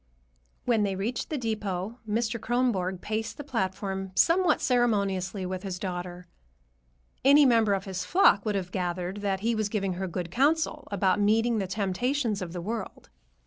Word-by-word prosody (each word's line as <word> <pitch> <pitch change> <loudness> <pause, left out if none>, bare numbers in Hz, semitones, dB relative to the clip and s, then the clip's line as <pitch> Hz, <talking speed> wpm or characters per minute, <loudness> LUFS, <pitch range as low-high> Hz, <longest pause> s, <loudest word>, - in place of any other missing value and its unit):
When 235 -3 +2
they 200 -2 0
reached 225 +6 -3
the 305 - -2
depot, 215 -2 -3
Mr. 230 +2 0
Kronborg 205 -7 0
paced 220 +1 -3
the 290 - -6
platform 195 -5 -3
somewhat 340 -1 +4
ceremoniously 200 -6 +1
with 185 0 -4
his 190 -2 -4
daughter. 180 -1 -5 1.0
Any 285 +2 +7
member 225 -5 +4
of 195 - -5
his 185 -2 -4
flock 200 - +4
would 210 -2 -1
have 180 -2 -3
gathered 180 +1 -2
that 195 -2 -2
he 230 +2 +1
was 215 -2 -1
giving 195 -3 -1
her 190 - -1
good 175 -1 -4
counsel 300 - +1
about 195 -1 +1
meeting 225 +2 +3
the 195 - -2
temptations 210 +4 -1
of 175 -2 -5
the 175 0 -5
world. 220 +3 -6
205 Hz, 165 wpm, -27 LUFS, 185-235 Hz, 1.0 s, Any